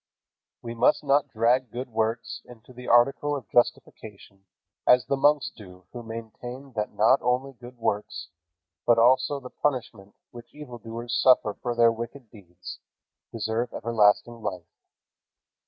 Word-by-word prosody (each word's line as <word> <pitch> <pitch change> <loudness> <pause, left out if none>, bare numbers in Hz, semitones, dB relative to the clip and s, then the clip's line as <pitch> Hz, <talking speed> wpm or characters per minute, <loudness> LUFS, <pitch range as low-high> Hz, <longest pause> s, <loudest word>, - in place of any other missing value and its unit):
We 115 - -5
must 120 - +2
not 140 0 +2
drag 125 +1 +1
good 125 +4 -6
works 110 0 -2
into 125 +1 -15
the 125 0 -11
article 135 +5 +3
of 130 -6 -7
justification 100 -4 -2 0.4
as 125 0 +5
the 140 - 0
monks 145 +1 +2
do 90 -3 -14
who 120 - -7
maintain 120 +4 -9
that 105 -2 -3
not 110 +6 +4
only 125 +2 -1
good 125 0 -13
works, 105 -7 -3 0.5
but 120 -1 +4
also 130 +4 +3
the 125 -2 -11
punishment 115 -8 -3 0.2
which 120 0 -13
evildoers 120 -4 -8
suffer 125 -5 +4
for 120 -1 -2
their 115 -1 +5
wicked 115 +1 -8
deeds, 90 -4 -11 0.5
deserve 115 +1 -2
everlasting 115 +1 +1
life. 90 -5 -5
120 Hz, 140 wpm, -26 LUFS, 110-125 Hz, 0.5 s, as